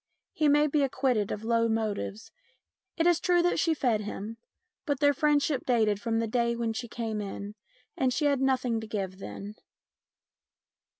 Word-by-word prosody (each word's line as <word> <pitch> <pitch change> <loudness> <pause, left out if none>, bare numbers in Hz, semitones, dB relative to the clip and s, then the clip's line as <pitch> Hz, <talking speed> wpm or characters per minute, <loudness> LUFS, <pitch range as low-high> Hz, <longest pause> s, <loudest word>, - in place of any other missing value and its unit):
He 305 - +2
may 295 +1 +5
be 300 0 +1
acquitted 255 -6 +1
of 210 - -4
low 230 0 +2
motives. 220 -1 -3 0.7
It 330 - +2
is 345 -1 +4
true 350 0 +3
that 355 - +2
she 325 -1 +2
fed 235 -7 +1
him, 210 +2 -6 0.5
but 285 -3 0
their 285 0 +4
friendship 295 -3 +1
dated 215 -5 +2
from 230 -1 -1
the 230 0 0
day 235 +1 +1
when 230 -1 -1
she 240 +2 -5
came 220 -2 -3
in, 200 0 -6 0.4
and 260 -1 +1
she 295 +4 0
had 280 -2 +2
nothing 255 -4 +1
to 220 - -7
give 195 -3 -4
then. 200 +1 -7
235 Hz, 175 wpm, -28 LUFS, 220-285 Hz, 0.7 s, may